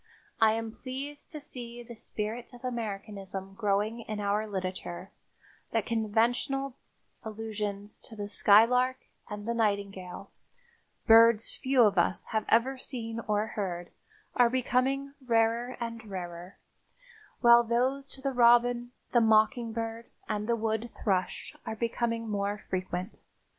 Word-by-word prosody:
I 220 -1 +5
am 225 0 -3
pleased 275 +5 -7
to 305 - -7
see 240 -4 -9
the 235 0 -10
spirit 225 +2 -5
of 245 +1 -10
Americanism 200 -4 -5
growing 210 +2 0
in 215 -2 -5
our 205 +1 0
literature, 185 - -5 0.6
that 225 -3 +1
conventional 235 +5 0 0.5
allusions 210 -2 -5
to 225 - -10
the 205 -1 -4
skylark 250 +6 +5 0.3
and 205 -1 -6
the 235 - +1
nightingale, 200 -4 -2 0.7
birds 225 0 +6
few 265 -2 +3
of 200 -4 +4
us 175 - +1
have 220 -1 +1
ever 260 +4 +3
seen 230 -4 -4
or 210 0 +1
heard, 180 -5 -4 0.4
are 245 -1 +5
becoming 260 +2 0
rarer 235 +1 +1
and 230 -1 -5
rarer, 175 -1 -7 0.8
while 235 -1 +8
those 255 +4 0
to 270 - -9
the 275 0 0
robin, 240 0 +4 0.2
the 240 - +5
mockingbird 225 0 +1 0.2
and 210 +1 -2
the 235 - +3
wood 220 +1 -1
thrush 185 -4 -1
are 220 - -4
becoming 230 0 -1
more 205 -1 -1
frequent. 185 0 -3
225 Hz, 130 wpm, -29 LUFS, 205-240 Hz, 0.8 s, while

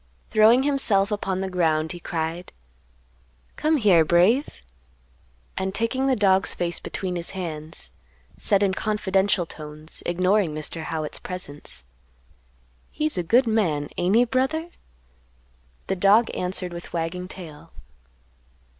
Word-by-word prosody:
Throwing 225 +4 +6
himself 225 -8 +2
upon 195 -2 -2
the 190 - -2
ground, 160 -4 +1
he 175 - -7
cried, 165 +1 -4 1.0
"Come 310 +1 +2
here, 195 - +5
Brave"; 180 - +2 0.9
and 190 0 -2
taking 260 +5 0
the 265 - +3
dog's 195 -3 +3
face 170 -1 -2
between 185 -2 -4
his 170 -1 -1
hands, 160 -3 -4 0.4
said 200 -2 +2
in 195 -1 +2
confidential 195 -3 +1
tones, 155 0 -9
ignoring 180 -1 +2
Mr. 155 +1 -5
Howitt's 155 -2 -3
presence, 150 - -6 1.0
"He's 310 +1 -2
a 180 - 0
good 235 +10 +3
man, 175 -11 0
ain't 180 +4 +1
he, 240 +2 +5
brother?" 270 +7 -1 1.1
The 190 - -2
dog 205 +5 +4
answered 180 -1 -3
with 170 0 -9
wagging 170 +2 -3
tail. 165 -3 -11
185 Hz, 125 wpm, -24 LUFS, 165-215 Hz, 1.1 s, Throwing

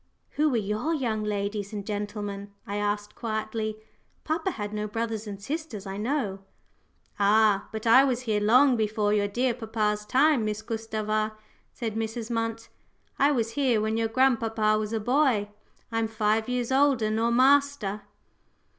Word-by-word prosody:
"Who 305 +1 +2
were 250 - +1
your 215 +10 -1
young 225 -7 -1
ladies 205 0 -3
and 205 -2 -5
gentlemen?" 205 -1 -4
I 205 - -4
asked 205 0 -2
quietly. 220 -1 -3 0.5
"Papa 320 +4 -1
had 210 - -5
no 210 0 -2
brothers 225 0 -3
and 200 -1 -6
sisters, 270 - -5
I 195 0 -5
know." 215 -4 -1 0.8
"Ah! 205 0 +3
but 220 0 -6
I 245 +4 +7
was 255 -3 0
here 220 -4 0
long 250 +5 +5
before 215 -1 0
your 205 -1 +2
dear 245 +4 0
papa's 215 -3 -1
time, 275 0 +3
Miss 215 0 -3
Gustava," 215 -1 -2 0.4
said 225 -4 -4
Mrs. 225 +1 -4
Munt. 225 0 -2 0.5
"I 285 +1 +5
was 230 -5 0
here 250 -3 +2
when 220 +1 0
your 225 0 +1
grandpapa 225 -3 +2
was 215 0 -3
a 225 - -1
boy. 245 -3 +2 0.4
I'm 225 0 0
five 220 +1 0
years 250 0 -1
older 265 -5 +3
nor 225 +2 +1
master." 260 -4 +3
220 Hz, 155 wpm, -27 LUFS, 210-245 Hz, 0.8 s, I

